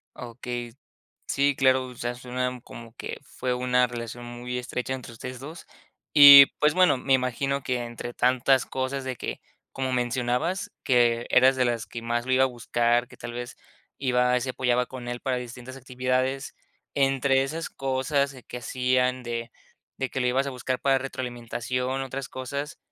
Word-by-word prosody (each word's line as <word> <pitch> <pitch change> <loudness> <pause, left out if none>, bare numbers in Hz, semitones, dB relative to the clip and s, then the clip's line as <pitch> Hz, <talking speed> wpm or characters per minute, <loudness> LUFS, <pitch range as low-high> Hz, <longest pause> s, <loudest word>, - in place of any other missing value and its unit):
Okey. 120 0 -6 0.5
Sí, 140 +1 +2
claro, 130 -1 +3
o 125 - -10
sea, 120 0 -3
suena 125 0 -3
como 115 -1 -11
que - - -6
fue 125 -1 -3
una 125 0 +2
relación 120 0 -7
muy 120 +1 -5
estrecha 125 +1 -3
entre 125 -2 -8
ustedes 125 +2 -8
2. 155 +5 -9 0.5
Y, 140 -2 +11
pues, 150 +1 +3
bueno, 185 -7 +4
me 135 +1 0
imagino 135 +2 0
que 125 -2 -1
entre 120 +1 -7
tantas 130 +1 +3
cosas 130 +1 -3
de 130 -1 -3
que, - - -5 0.3
como 130 -1 -2
mencionabas, 125 - -1
que 120 -2 +3
eras 130 +1 +6
de 130 - +2
las 115 -3 -1
que 115 +3 -8
más 120 +1 -2
lo 130 - 0
iba 130 +1 +4
a - - +4
buscar, 120 0 0
que - - -16
tal - - -7
vez, 120 0 -6 0.4
iba 125 -1 +2
se 130 - -2
apoyaba 125 -1 +1
con 125 -2 -9
él 120 0 -4
para 130 -2 -1
distintas 125 +1 -8
actividades. 130 +1 -2 0.4
Entre 135 -1 +2
esas 160 +4 -4
cosas 135 +1 -1
que 125 - -6
hacían 125 +1 0
de 115 -1 -4 0.5
de 130 - -2
que 130 - -5
lo 125 - +1
ibas 130 +3 +1
a - - -2
buscar 130 0 -3
para 135 -1 +3
retroalimentación, 125 0 -3
otras 135 0 -5
cosas, 140 +4 -5
125 Hz, 175 wpm, -26 LUFS, 120-135 Hz, 0.5 s, Y